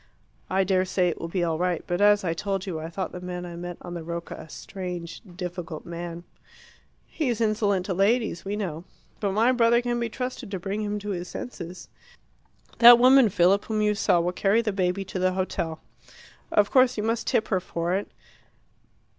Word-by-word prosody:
"I 190 +1 +2
dare 185 0 +2
say 185 -1 +1
it 165 - -5
will 165 - -3
be 175 +1 -1
all 165 -2 -1
right. 180 -2 0
But, 175 +2 -2
as 205 0 +5
I 165 -3 0
told 195 +2 -3
you, 175 -5 -4
I 160 +1 -6
thought 190 +3 -4
the 180 - -8
man 180 0 -5
I 170 -1 -8
met 175 0 -6
on 175 - -7
the 170 - -5
Rocca 170 +1 -5
a - - -10
strange, 180 -3 -7 0.2
difficult 175 -3 -6
man." 170 0 -6 0.8
"He's 250 -8 -2
insolent 210 -4 +1
to 190 - -2
ladies, 200 -1 +1
we 200 +1 -3
know. 175 -6 -4 0.4
But 200 -2 -1
my 225 +5 +4
brother 235 -1 +4
can 240 0 -1
be 235 -1 -1
trusted 250 -1 -5
to 195 -2 -4
bring 200 +4 -3
him 210 0 -2
to 205 0 -5
his 180 -2 -4
senses. 180 -6 -7 0.9
That 240 0 +10
woman, 255 -1 +6
Philip, 195 +1 +3
whom 215 -1 -1
you 210 0 +3
saw 190 -3 +2
will 175 +1 0
carry 200 +5 +2
the 210 -3 -1
baby 190 0 0
to 190 - -5
the 185 0 +2
hotel. 170 -4 -3 0.7
Of 205 -1 +3
course 255 -2 +4
you 210 - -1
must 230 +1 -1
tip 220 - +1
her 190 - +2
for 170 0 -3
it. 195 +2 -2
190 Hz, 205 wpm, -26 LUFS, 175-215 Hz, 0.9 s, That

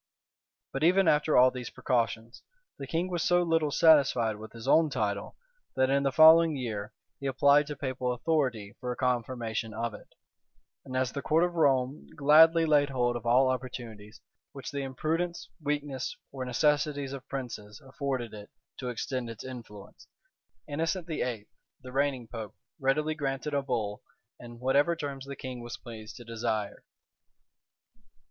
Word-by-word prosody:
But 135 - -2
even 185 +2 +4
after 150 0 +3
all 130 +1 +7
these 125 -2 -6
precautions, 115 0 -2 0.4
the - - -6
king 170 +2 -1
was 175 -2 -2
so 175 +1 +3
little 165 -3 +1
satisfied 135 -8 +4
with 110 0 -10
his 115 -1 -10
own 160 -1 +5
title, 105 -6 -2 0.4
that 130 0 +2
in 140 0 +3
the 135 -1 +1
following 160 +2 +7
year, 110 -6 -4 0.3
he 140 - -3
applied 140 +2 +4
to 150 - -5
papal 130 -2 -2
authority 125 -6 -1
for 125 0 -3
a - - -3
confirmation 120 -3 -2
of 115 0 -2
it; - - -12 0.8
and 130 -1 -5
as 130 -1 0
the 140 - -4
court 160 +4 +2
of 175 0 0
Rome 135 -4 +1
gladly 160 +3 +6
laid 145 -2 +3
hold 120 -2 0
of 120 -1 -5
all 130 +3 +5
opportunities 120 -4 -5 0.3
which 135 - -7
the 140 0 -3
imprudence, 160 +6 -2
weakness, 145 -3 -3
or 130 -2 -5
necessities 145 +1 +1
of 135 -1 -9
princes 110 -6 -6
afforded 130 -3 -4
it 105 -1 -10 0.3
to 125 - -3
extend 125 0 -3
its 115 - -8
influence, 115 -6 -10 0.6
Innocent 165 +4 -2
VIII., 125 -10 -3 0.4
the 130 - -9
reigning 135 -3 0
pope, 110 -4 -7 0.2
readily 150 +3 +1
granted 140 -1 -3
a 140 - +2
bull, 110 -6 -3 0.4
in 120 -1 -11
whatever 140 +7 +2
terms 140 -4 -6
the 140 - -6
king 130 -2 -7
was 120 0 -7
pleased 110 -3 -10
to 120 - -10
desire. 110 -3 -3
130 Hz, 160 wpm, -29 LUFS, 120-150 Hz, 0.8 s, all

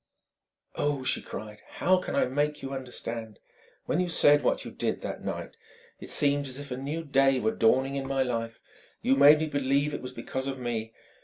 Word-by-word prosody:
"Oh!" 145 -2 -1
she - - +1
cried 105 +1 -8
"how 185 +1 +3
can 185 - -4
I - - +3
make 145 +3 -1
you 135 - -4
understand?... 115 -4 -5 0.5
When 165 - 0
you 180 -1 0
said 145 -3 +5
what 125 - 0
you - - -7
did, - - -2
that - - -6
night - - -5 0.4
it - - -10
seemed 145 -1 +2
as 130 0 -3
if 140 -2 -8
a - - -1
new 145 +5 -4
day 135 -3 +3
were 110 -2 +1
dawning 130 +4 +3
in 135 -1 -3
my 135 -1 +1
life. 115 -2 -3 0.4
You 135 - +4
made 145 +2 +8
me 160 - -1
believe 140 0 0
it - - -4
was 125 - -6
because 130 +2 -5
of 135 -1 -3
me. 115 -3 -3
135 Hz, 205 wpm, -28 LUFS, 125-145 Hz, 0.5 s, made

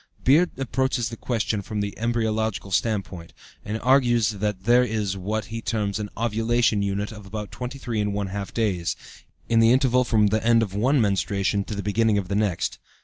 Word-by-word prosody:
Beard 160 +7 +5
approaches 130 -2 -1
the 115 - -7
question 110 -3 -2
from 105 +2 -5
the 100 0 -3
embryological 110 -4 -1
standpoint, 95 -5 -2 0.3
and 110 +2 -3
argues 120 -4 +4
that 105 -2 -3
there 120 +3 +5
is 105 -4 -1
what 105 +3 -3
he 115 - -4
terms 105 -3 -2
an 105 -1 -4
"ovulation 115 -1 +1
unit" 100 +2 -2
of 105 -2 -11
about 105 0 -6
23½ 105 -6 -3
days, 90 -8 -1 0.5
in 115 -1 +3
the 115 0 +6
interval 125 -1 +3
from 110 -3 +2
the 110 - +1
end 115 0 +4
of 100 -4 -5
one 130 +8 +2
menstruation 100 -1 +1
to 105 - -5
the 100 - -4
beginning 110 +1 +2
of 95 -3 -3
the 100 - -1
next. 105 -4 -1
110 Hz, 175 wpm, -24 LUFS, 100-120 Hz, 0.5 s, the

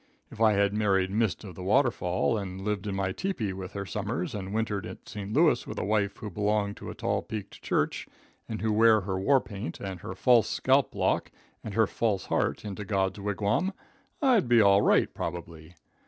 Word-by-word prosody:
If 110 - -9
I 110 -1 +6
had 100 0 +2
married 100 -3 +1
Mist 110 0 0
of 95 -4 -8
the 90 - -10
Waterfall, 100 -2 +1
and 95 -3 -4
had 95 - -6
lived 105 -1 -2
in 100 - -2
my 95 -1 -1
tepee 120 - -2
with 95 +1 -7
her 100 -1 -4
summers, 105 - -3
and 95 -2 -5
wintered 105 -2 -1
at - - -11
St. 105 -1 -6
Louis - - +3
with - - -6
a - - -2
wife 100 -1 0
who 105 - -7
belonged 105 +1 0
to - - -8
a - - -7
tall - - -1
peaked 105 -2 -7
church, - - -1 0.4
and 110 -1 -4
who 110 -1 +1
wore 110 0 +5
her 95 0 -3
war 135 +8 +4
paint, 100 -8 -7
and 95 -2 -5
her 90 - -7
false 120 +2 +4
scalp - - +2
lock, - - +1 0.3
and 105 -3 -6
her 110 - +5
false 105 -2 -1
heart - - -1
into 105 0 -5
God's 95 -1 -1
wigwam, 105 - 0 0.5
I'd 245 - +4
be 120 -1 +5
all 100 -1 +6
right, - - +3
probably. 85 -1 -6
100 Hz, 205 wpm, -28 LUFS, 95-110 Hz, 0.5 s, I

